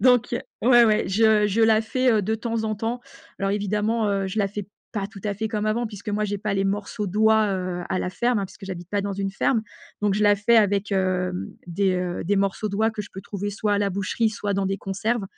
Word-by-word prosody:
Donc 245 0 +4 0.3
ouais, 240 0 +7
ouais, 215 -1 +3
je 215 +1 +4
je 210 +3 0
la 220 -1 +5
fais, 255 +2 +1
heu, 210 -2 +2
de 220 +3 0
temps 225 0 -2
en 215 0 -1
temps. 230 +4 -3 0.4
Alors 195 0 0
évidemment, 210 +2 0
heu, 195 -1 0
je 190 +3 -4
la 200 -1 +2
fais 205 -1 -6 0.3
pas 200 -3 -2
tout 205 -2 -12
à 205 - 0
fait 220 +2 -3
comme 215 -1 -2
avant 235 +3 0
puisque 210 -1 -9
moi 210 +1 0
j'ai 205 0 -2
pas 210 0 -2
les 195 - +1
morceaux 205 +2 -2
d'oies, 220 +2 +3
heu, 180 -1 -3
à 185 - 0
la 180 - -2
ferme, 240 +3 +1
hein, 195 - -1
puisque 195 - -13
j'habite 175 -2 -7
pas 205 - +1
dans 200 0 -3
une 195 0 -2
ferme, 220 +3 +1 0.4
donc 205 -2 +2
je 210 - 0
la 205 0 +5
fais 230 +3 +3
avec, 205 -1 +2
hem, 185 -1 0 0.2
des, 190 +2 +1
heu, 180 -1 -2
des 205 +3 +1
morceaux 195 +2 0
d'oies 220 +3 +1
que 220 - -6
je - - -11
peux 190 - -7
trouver 205 0 -4
soit 205 0 0
à - - +1
la 200 -1 +1
boucherie, 200 +4 0
soit 205 -1 -3
dans 195 0 0
des 195 +1 -1
conserves, 200 +3 -2
205 Hz, 255 wpm, -24 LUFS, 195-220 Hz, 0.4 s, ouais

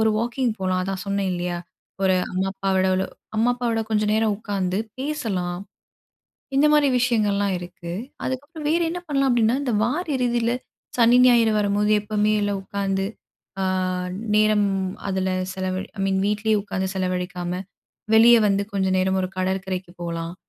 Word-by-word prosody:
ஒரு 220 0 +4
வாக்கிங் 240 +1 0
போலாம். 185 -1 0
அதான் 190 0 -3
சொன்னேன் 200 -1 0
இல்லையா? 175 0 -2 0.4
ஒரு 190 -1 +4 0.2
அம்மா 190 +1 0
அப்பாவோட 190 -1 +1 0.5
அம்மா 230 +3 +3
அப்பாவோட 235 -2 -1
கொஞ்சம் 210 -1 +1
நேரம் 220 -1 +2
உட்காந்து 195 -3 -2 0.2
பேசலாம். 205 -12 -2 1.0
இந்த 280 +2 +5
மாரி 295 -1 +5
விஷயங்கள்லாம் 205 -5 +1
இருக்கு. 175 -1 -8 0.3
அதுக்கப்புறம் 290 +4 -5
வேறு 340 +2 +2
என்ன 355 +2 -3
பண்லாம்? 275 -2 +1
அப்டின்னா 235 0 +3
இந்த 250 -5 -1
வார 275 +10 0
இறுதியில 240 -2 +1 0.5
சனி, 240 0 +6
ஞாயிறு 235 -3 +5
வரும்போது 205 +1 +1
எப்போவுமே 210 0 +1
இல்ல 205 0 0
உட்காந்து 195 0 -2 0.6
அ - - +1 0.7
நேரம் 215 -1 +4 0.4
அதுல 190 -1 0 0.2
செலவழி 185 0 -3
ஐ - - -2
மீன் 190 0 +1
வீட்லயே 215 +1 +1
உட்காந்து 190 -2 -3
செலவழிக்காம, 180 -1 -2 0.5
வெளியே 235 +2 +8
வந்து 200 0 +1
கொஞ்சம் 190 -1 +1
நேரம் 190 +1 +1
ஒரு 185 - -2
கடற்கரைக்கு 185 -1 -2
போகலாம். 170 0 -4
200 Hz, 145 wpm, -23 LUFS, 190-235 Hz, 1.0 s, வெளியே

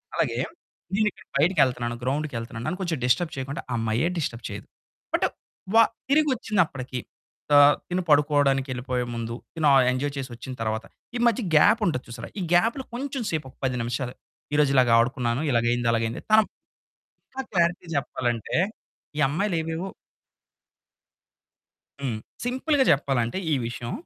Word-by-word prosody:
అలాగే - - 0 0.6
నేను 215 0 +3
ఇక్కడ 190 - -18
బయటికెళ్తున్నాను, 130 -7 +2
గ్రౌండ్‌కి 145 +2 -1
వెళ్తున్నాను, 115 0 -6
నన్ను 185 - -2
కొంచెం 170 -5 -1
డిస్టర్బ్ 125 +7 +2
చేయకుండా 135 +2 -4
ఆ - - 0
అమ్మాయే 115 +7 +1
డిస్టర్బ్ 120 -6 -3
చేయదు. 105 0 -7 0.5
బట్ - - +2 0.8
తిరిగి 300 +1 +4
వచ్చినప్పటికీ 155 - -1 0.6
ఆహ్, 145 0 +8
తిను 180 +1 0
పడుకోవడానికి 145 -2 +3
వెళ్ళిపోయే 125 0 -2
ముందు 115 0 -4 0.2
తిను, 155 -2 +2 0.2
ఎంజాయ్ 140 +3 -1
చేసి 135 -1 -4
వచ్చిన 130 +2 -7
తరువాత 110 0 -2 0.3
ఈ - - +1
మధ్య 235 +1 +2
గ్యాప్ 220 +9 +6
ఉంటది 130 -7 0
చూసారా. 115 0 -7
ఈ - - -2
గ్యాప్‌లో 230 +9 +3
కొంచెం 270 +1 -3
సేపు 155 -3 -2
ఒక - - -19
10 125 -1 0
నిమిషాలు 120 +2 -3 0.4
ఈరోజు 150 -2 +4
ఇలాగ 125 -2 +5
ఆడుకున్నాను, 120 +1 +1
ఇలాగైయింది, 120 0 +2
అలాగైంది. 115 0 -1
తనం 215 0 +7 0.8
ఇంకా 265 0 -5
క్లారిటీ 175 -1 +1
చెప్పాలంటే 120 -4 -2 0.6
ఈ - - -2
అమ్మాయిలు 180 +6 0
ఏవేవో 165 +4 -4 2.1
హ్మ్. 125 -6 -2 0.3
సింపుల్‌గా 265 +3 +2
చెప్పాలంటే 135 -3 +1 0.2
ఈ - - +4
విషయం. 120 0 -5
140 Hz, 140 wpm, -25 LUFS, 120-175 Hz, 2.1 s, ఆహ్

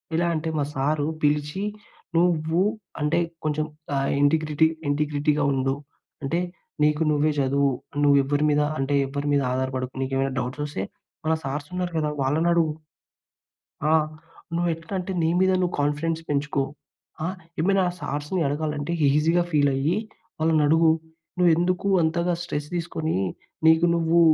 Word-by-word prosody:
ఎలా 170 +1 +2
అంటే 160 +1 -2
మా - - +2
సారు 145 +2 +1 0.2
పిలిచి 150 +5 +1 0.5
"నువ్వు 165 0 +2 0.4
అంటే 150 +3 +2 0.3
కొంచెం 155 0 0 0.3
ఆ - - +1 0.2
ఇంటిగ్రిటీ, 155 +1 +3 0.2
ఇంటిగ్రిటీగా 150 0 +1
ఉండు, 135 0 0 0.5
అంటే 165 +5 0 0.5
నీకు 150 +1 +2
నువ్వే 150 +1 +2
చదువు, 140 +1 +2 0.3
నువ్వు 140 -1 +6
ఎవ్వరి 145 +2 0
మీద 150 0 +3 0.2
అంటే 135 +1 +1
ఎవ్వరి 140 +2 -3
మీద 140 - +3
ఆధారపడకు, 130 0 -2
నీకేవైనా 135 0 -1
డౌట్స్ 125 +4 -4
వస్తే 145 -10 -4 0.4
మన 160 - +3
సార్స్ 145 +2 -4
ఉన్నారు 180 -1 -2
కదా! 150 -1 0
వాళ్ళని 155 +6 +2
అడుగు." 160 -3 +2 1.1
"ఆ! - - +3 0.6
నువ్వు 175 0 +1
ఎట్లా 165 +4 -10
అంటే 180 +1 -4
నీ 160 - +2
మీద 190 0 +4
నువ్వు 180 -1 0
కాన్‌ఫిడెన్స్ 155 +3 0
పెంచుకో. 145 -1 0 0.6
ఆ! - - 0 0.3
ఏమైనా 195 +3 +3 0.2
సార్స్‌ని 150 +6 -2
అడగాలంటే 150 +1 -2 0.2
ఈజీగా 160 +5 +3
ఫీల్ 145 -2 +4
అయ్యి, 145 +6 +1 0.4
వాళ్ళని 160 -1 +3
అడుగు. 160 +2 +5 0.5
నువ్వు 180 -1 +5
ఎందుకు 180 +3 0 0.2
అంతగా 170 +2 +1
స్ట్రెస్ 150 -4 -3
తీసుకొని, 160 -2 -2 0.5
నీకు 160 +1 +6
నువ్వు, 165 0 +3
150 Hz, 140 wpm, -25 LUFS, 145-165 Hz, 1.1 s, నువ్వు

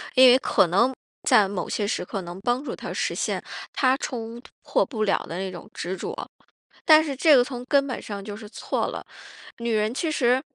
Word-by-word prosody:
因 260 0 +9
为 250 - +7
可 190 - +3
能 235 +10 +3 0.3
在 205 -2 +6
某 195 -1 -4
些 205 -2 -1
时 - - -1
刻 195 +2 -5
能 175 +1 -8
帮 245 +5 0
助 - - -5
她 - - -7
实 - - -1
现 - - -2 0.3
她 260 -1 +3
冲 235 -4 -5 0.2
破 - - +1
不 220 -5 -3
了 200 - +2
的 170 - -7
那 190 0 -3
种 175 - -10
执 180 +3 -4
着。 - - -6 0.6
但 310 -1 +7
是 285 -4 -4
这 305 +3 +6
个 245 - +6
从 245 -1 -6
根 280 +1 +2
本 255 - -4
上 200 -2 -6
就 205 0 -7
是 215 -1 -10
错 - - -2
了。 - - -6 0.6
女 235 0 -2
人 215 +1 +1
其 320 +5 -1
实 250 -2 +2
235 Hz, 235 characters per minute, -25 LUFS, 200-260 Hz, 0.6 s, 因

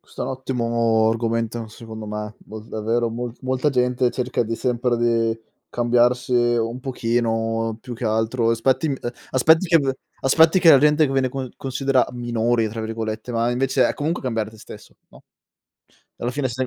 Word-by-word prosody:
Questo - - -8
è - - -1
un 135 - -3
ottimo 115 -4 +1
argomento, 115 0 -2
secondo 110 -1 -9
me. 105 0 -5
Mol 110 0 -9
davvero 115 +2 -1
mol 120 +1 -4
molta 130 +3 0
gente 125 -1 +1
cerca 125 -1 -1
di 115 0 -3
sempre 125 -1 0
di 115 -1 +1 0.3
cambiarsi 120 +1 +1
un 120 0 +1
pochino, 115 -3 -1
più 125 +1 -8
che 120 +1 -6
altro 110 +2 +1
aspetti 130 +6 +1
m 140 - -1
ehm, 120 - -3 0.2
aspetti 160 +7 +4
che 165 -1 +5
v 135 -2 0 0.3
aspetti 160 +6 +5
che 165 -3 +7
la 140 - +8
gente 150 +1 +4
viene 135 -1 +1
con 130 0 -5
considera 135 0 0
"minori" 120 -1 0
tra 115 +1 -6
virgolette, 110 +1 -4
ma 115 +1 +1
invece, 130 +2 +2
è - - -2
comunque 160 +4 -2
cambiare 115 -4 -2
te 110 - -16
stesso, - - -13
no. - - -17 1.0
Alla 120 - -1
fine, 135 0 -1
sei 130 +2 -3
120 Hz, 175 wpm, -22 LUFS, 115-130 Hz, 1.0 s, la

